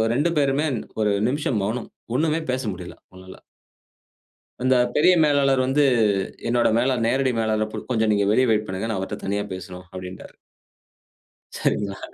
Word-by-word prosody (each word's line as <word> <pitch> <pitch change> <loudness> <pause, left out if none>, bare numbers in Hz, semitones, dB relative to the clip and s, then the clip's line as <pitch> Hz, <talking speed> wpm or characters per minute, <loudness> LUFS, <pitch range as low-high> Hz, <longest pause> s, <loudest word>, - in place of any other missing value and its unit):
2 145 +6 +2
பேருமே 140 +2 +1 0.3
ஒரு 105 -1 +2 0.2
நிமிஷம் 135 -4 -1
மௌனம். 115 +4 -3 0.3
ஒண்ணுமே 160 +3 +1
பேச 130 +1 -1
முடியல, 90 -1 -9
அவுங்கனால. 95 0 -14 1.2
அந்த 130 0 +4 0.2
பெரிய 170 +5 +5
மேலாளர் 140 -3 +3
வந்து, 135 +3 +2 0.7
என்னோட 120 0 +3
மேலாளர் 125 -1 +1
நேரடி 130 +1 +1
மேலாளர் 110 -1 0
இப்ப 110 0 -6
கொஞ்சம் 110 -2 +2
நீங்க 100 -1 +1
வெளிய 130 +4 +3
வெயிட் 105 -1 +1
பண்ணுங்க. 95 +4 -3
நான் 110 - -1
அவர்ட்ட 95 - -5
தனியா 100 +1 -1
பேசணும் 90 0 -9
அப்பிடின்ட்டாரு. 90 0 -9 1.2
சரிங்களா? 100 -1 -1
115 Hz, 145 wpm, -23 LUFS, 100-135 Hz, 1.2 s, பெரிய